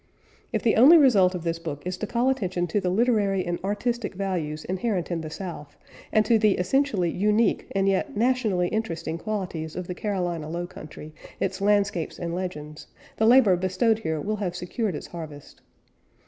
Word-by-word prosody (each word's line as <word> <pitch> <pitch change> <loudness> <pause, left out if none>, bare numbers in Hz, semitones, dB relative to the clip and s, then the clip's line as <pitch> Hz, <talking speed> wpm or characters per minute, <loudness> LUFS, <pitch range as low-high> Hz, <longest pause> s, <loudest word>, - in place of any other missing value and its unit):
If - - -1
the 230 - +3
only 285 +9 +9
result 200 - +5
of 175 - -5
this 165 -1 -2
book 150 -3 -6
is 180 0 -2
to 215 - -4
call 240 +4 +1
attention 185 -9 -1
to 190 +4 -1
the 180 - 0
literary 200 -3 +2
and 175 0 -2
artistic 210 +2 -2
values 170 -6 -3
inherent 185 -1 -2
in 170 -1 -1
the 155 - -6
South, 160 -4 -8 0.3
and 215 -1 +3
to 225 +1 +4
the 210 -2 +4
essentially 190 -3 +1
unique 210 +5 +1
and 195 0 +2
yet 195 +1 0
nationally 220 -7 +1
interesting 170 -7 -3
qualities 180 -6 -4
of 180 - -4
the 180 - -5
Carolina 175 -5 -3
Low 175 +2 -3
Country, 155 -3 -11 0.3
its 190 0 -2
landscapes 200 -4 +1
and 170 -1 -4
legends, 155 -4 -6 0.3
the 220 - +3
labor 235 -6 +6
bestowed 185 +5 +1
here 160 -7 -2
will 215 +7 -2
have 185 -4 -3
secured 180 +2 -3
its - - -6
harvest. 155 -4 -10
185 Hz, 180 wpm, -25 LUFS, 170-215 Hz, 0.3 s, only